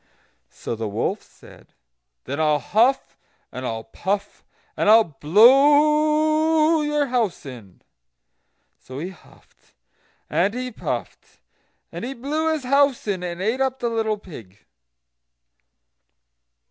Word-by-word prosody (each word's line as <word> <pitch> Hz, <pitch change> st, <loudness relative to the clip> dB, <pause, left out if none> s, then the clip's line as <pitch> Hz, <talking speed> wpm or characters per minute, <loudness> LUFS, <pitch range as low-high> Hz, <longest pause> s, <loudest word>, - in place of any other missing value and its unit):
So -, -, -7 dB
the 110 Hz, 0 st, -4 dB
wolf 100 Hz, -, -2 dB
said: -, -, -19 dB, 0.5 s
"Then 140 Hz, +3 st, -5 dB
I'll 155 Hz, -1 st, +2 dB
huff, 235 Hz, -, +1 dB, 0.4 s
and 130 Hz, 0 st, -6 dB
I'll 115 Hz, 0 st, -4 dB
puff, 195 Hz, -, -4 dB, 0.3 s
and -, -, +1 dB
I'll 225 Hz, +1 st, +7 dB
blow 300 Hz, -, +3 dB
your 295 Hz, -1 st, 0 dB
house 240 Hz, -, -2 dB
in." 115 Hz, -9 st, -12 dB, 1.0 s
So 130 Hz, -, -11 dB
he 170 Hz, +6 st, -5 dB
huffed, 190 Hz, -, -21 dB, 0.5 s
and 180 Hz, +8 st, 0 dB
he 250 Hz, 0 st, -4 dB
puffed, -, -, -6 dB, 0.5 s
and -, -, -7 dB
he 265 Hz, +3 st, -5 dB
blew 305 Hz, +6 st, -2 dB
his 310 Hz, -3 st, -3 dB
house 275 Hz, -2 st, +1 dB
in, 195 Hz, -3 st, -2 dB
and 175 Hz, 0 st, -5 dB
ate 230 Hz, +6 st, -1 dB
up 265 Hz, -1 st, 0 dB
the 240 Hz, -2 st, -2 dB
little 220 Hz, -2 st, -1 dB
pig. 115 Hz, -, -14 dB
225 Hz, 120 wpm, -22 LUFS, -, 1.0 s, I'll